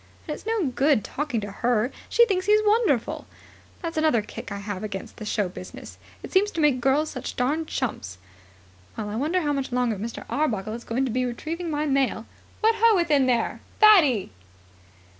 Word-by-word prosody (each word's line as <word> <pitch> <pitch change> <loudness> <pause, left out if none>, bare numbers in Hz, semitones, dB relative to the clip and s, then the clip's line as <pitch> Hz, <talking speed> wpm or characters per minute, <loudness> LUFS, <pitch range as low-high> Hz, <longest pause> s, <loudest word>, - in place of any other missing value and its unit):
And 305 - -2
it's 420 - -10
no 445 -5 +1
good 270 -1 +2
talking 280 -6 -3
to 205 0 -6
her; 240 +3 0 0.2
she 475 - +5
thinks 375 -3 -1
he's 425 +1 +5
wonderful. 415 - +1 0.6
That's 330 -1 -4
another 310 -9 +3
kick 210 - -9
I 200 - -3
have 200 -1 -5
against 200 -3 -6
the 215 - -7
show 205 -2 0
business. 180 0 -10 0.2
It - - -8
seems 395 +2 +3
to - - -3
make 290 -5 +3
girls 285 +4 +2
such 255 - -6
darned 300 +6 0
chumps. 105 - -4 0.8
Well, 210 -2 -4
I 210 - -4
wonder 315 +10 0
how 295 -2 0
much 275 -2 -3
longer 245 -3 0
Mr. 225 +4 -6
Arbuckle 220 -8 -1
is 235 +1 -7
going 255 +4 0
to 255 - -2
be 255 +3 0
retrieving 320 +8 -4
my 300 0 -1
mail. 270 -6 0 0.4
What 445 +1 +4
ho, 455 -1 +6
within 295 -7 +3
there, 240 -2 0 0.2
Fatty!" 320 - +6
270 Hz, 190 wpm, -25 LUFS, 225-325 Hz, 0.8 s, ho